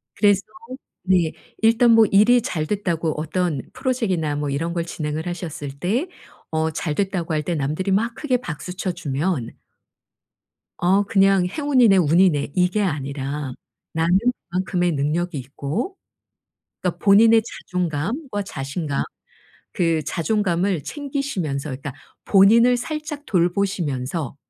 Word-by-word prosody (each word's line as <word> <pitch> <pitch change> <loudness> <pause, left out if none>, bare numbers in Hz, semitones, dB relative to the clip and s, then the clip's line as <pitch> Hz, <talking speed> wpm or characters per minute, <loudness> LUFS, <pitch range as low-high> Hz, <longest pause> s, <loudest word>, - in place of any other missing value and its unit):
그래서 200 -1 +4 0.6
네. 180 -4 +2 0.3
일단 230 +2 +5
뭐 225 -1 +7
일이 230 +5 +5
잘 155 -7 -2
됐다고 170 -5 -1
어떤 160 -2 -1
Project이나 195 - -1
뭐 145 0 -2
이런 165 +5 -2
걸 170 -1 -2
진행을 155 0 -4
하셨을 160 -5 -5
때 230 - 0 0.4
어 160 0 0
“잘 155 0 -3
됐다.”고 185 -4 -1
할 155 -1 0
때 170 +2 -2
남들이 155 +7 -1
막 230 +4 +1
크게 265 -4 0
박수 180 - -6
쳐 185 - -1
주면 145 -4 -2 1.3
'어 190 +3 +3
그냥 195 -3 +3
행운이네. 255 - +3
운이네.' 165 -3 +3
이게 180 +3 +2
아니라 140 -3 -3 0.4
나는 165 +3 +3 0.3
그만큼의 180 0 0
능력이 155 +3 -1
있고 145 - -4 0.9
그러니까 180 -2 -1
본인의 220 +3 +6
자존감과 190 - -3
자신감 145 -2 -3 0.7
그 165 -3 +1
자존감을 180 0 0
챙기시면서 265 - -3
그러니까 135 +1 -6 0.3
본인을 230 +5 +6
살짝 305 +3 -5
돌보시면서 170 - -1
180 Hz, 285 characters per minute, -22 LUFS, 155-205 Hz, 1.3 s, 뭐